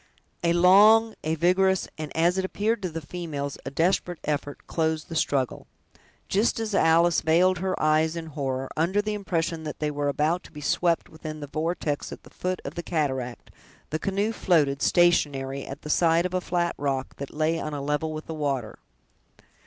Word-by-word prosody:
A 170 0 +3
long, 210 +6 +6
a 160 +1 0
vigorous, 185 +3 +2
and, 155 -2 -6
as 175 +3 +3
it - - 0
appeared 210 +4 -1
to 185 - -2
the 165 0 -5
females, 145 -6 -5
a - - -1
desperate 175 +3 0
effort, 145 -1 -3
closed 160 -1 -1
the 165 - -5
struggle. 135 -5 0 0.6
Just 210 +4 +1
as 220 -2 -3
Alice 170 -1 +4
veiled 180 +3 +3
her 185 0 -2
eyes 155 +1 +2
in 165 -1 -5
horror, 135 -4 -3
under 175 +6 +1
the 215 +1 -1
impression 170 -5 -2
that 155 -1 -6
they 150 -1 -1
were 145 0 -2
about 155 +5 +1
to - - -14
be 150 - -10
swept 170 +3 +1
within 155 -1 -8
the 145 - -5
vortex 155 0 -2
at - - -9
the - - -16
foot 185 0 -3
of - - -5
the 170 - -4
cataract, 130 -8 -3 0.4
the 155 - -1
canoe 200 +5 0
floated, 150 -10 +2
stationary, 140 -6 +2
at 135 +2 -8
the - - -7
side 165 +1 +3
of 180 - -3
a 185 - 0
flat 175 -1 0
rock, 135 -2 -2
that 140 - -6
lay 160 +2 0
on 150 -1 -4
a - - -3
level 150 +3 -1
with 155 0 -6
the 160 - -6
water. 140 -7 -3
160 Hz, 190 wpm, -26 LUFS, 150-180 Hz, 0.6 s, long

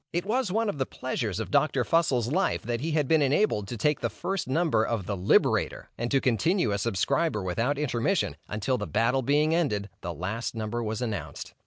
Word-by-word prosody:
It 175 +2 -1
was 225 -1 0
one 225 +3 +1
of 175 -9 -3
the 130 - 0
pleasures 115 -6 -3
of - - -4
Dr. - - +2
Fussell's 130 -8 +1
life 190 +5 +1
that 120 0 -2
he 160 +2 -2
had 150 -3 +1
been 160 +1 +4
enabled 140 - +2
to 120 - -5
take 150 +6 +1
the 115 - -1
first 190 - -3
number 155 -4 +2
of 115 -5 -2
the 100 - -2
"Liberator," 90 0 +1
and 120 +1 -3
to 135 - +3
continue 130 - +1
a 100 - 0
subscriber 115 - 0
without 115 +10 0
intermission, 120 - 0
until 110 +5 -1
the 105 - -4
battle 125 +4 +1
being 150 +5 +2
ended, 105 -12 0
the 85 - -4
last 100 - -4
number 110 +1 -3
was 110 +1 -3
announced. 100 -10 -5
125 Hz, 205 wpm, -27 LUFS, 105-155 Hz, -, been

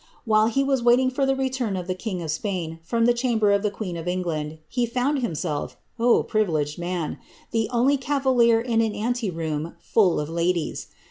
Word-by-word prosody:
While 215 -1 +4
he 270 +4 +1
was 270 -2 +1
waiting 245 +2 +4
for 270 +1 0
the 270 - +2
return 260 -6 -1
of 180 - -4
the 185 - -1
king 185 -2 -4
of 160 - -2
Spain 165 -2 -3
from 230 +8 0
the 240 - +5
chamber 235 -4 +2
of 200 0 +3
the 210 - +1
queen 200 -3 -5
of 165 0 -6
England, 160 -4 -2
he 245 -1 -1
found 255 +5 0
himself 155 - -3 0.3
— 240 0 +4
privileged 160 -8 0
man! 175 -2 -3 0.2
— - - -28
the 225 -2 0
only 260 +4 +3
BSTalier 255 -4 +2
in 230 -2 +2
an 220 -2 0
ante 240 0 -1
room 160 -1 -4
full 190 -6 +2
of 150 - -2
ladies. 170 +1 -1
215 Hz, 200 wpm, -24 LUFS, 170-245 Hz, 0.3 s, the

